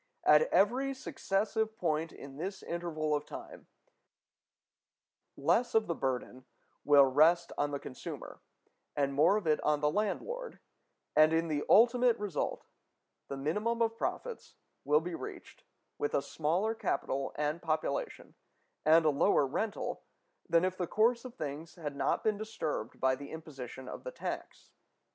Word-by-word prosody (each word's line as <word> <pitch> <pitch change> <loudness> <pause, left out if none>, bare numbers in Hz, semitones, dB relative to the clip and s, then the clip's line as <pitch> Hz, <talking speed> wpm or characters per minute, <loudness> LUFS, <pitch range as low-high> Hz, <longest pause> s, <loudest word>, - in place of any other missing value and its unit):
At 485 - +5
every 260 +7 +3
successive 220 -2 -1
point 160 -1 -1
in 140 0 -11
this 190 +4 -5
interval 160 -3 -2
of 145 - 0
time, - - -10 1.7
less 240 -1 +2
of 220 -1 +4
the 170 - -1
burden 130 -3 -3 0.4
will 145 -1 +7
rest 160 +6 +4
on 145 - 0
the 145 - -2
consumer, 130 - -8 0.5
and 140 -1 +1
more 160 +9 +4
of 210 - -4
it 155 -1 +2
on 150 -1 +2
the 150 0 +2
landlord; 465 - -2 0.6
and, 155 +1 +6
in 165 0 +1
the 150 -1 0
ultimate 240 +1 +5
result, 205 -6 -3 0.6
the 140 - -5
minimum 210 +12 -1
of 225 0 0
profits 475 - -4 0.3
will 150 +2 +4
be 175 +1 -5
reached - - -8 0.3
with 145 - -1
a 140 - +1
smaller 170 +10 0
capital 135 -10 -2
and 150 +3 -1
population 155 -3 -2 0.5
and 160 +1 +5
a 155 - +5
lower 145 +1 +3
rental 205 +11 -3 0.5
than 170 +1 +4
if 185 0 -1
the 180 - -1
course 235 +5 +2
of 250 - -8
things 150 +3 -6
had 150 -5 -5
not 140 - 0
been 215 -2 +1
disturbed 190 - -4
by 130 0 +3
the 140 +2 -7
imposition 135 -5 -8
of - - -7
the - - -5
tax. - - -6
165 Hz, 150 wpm, -32 LUFS, 145-215 Hz, 1.7 s, will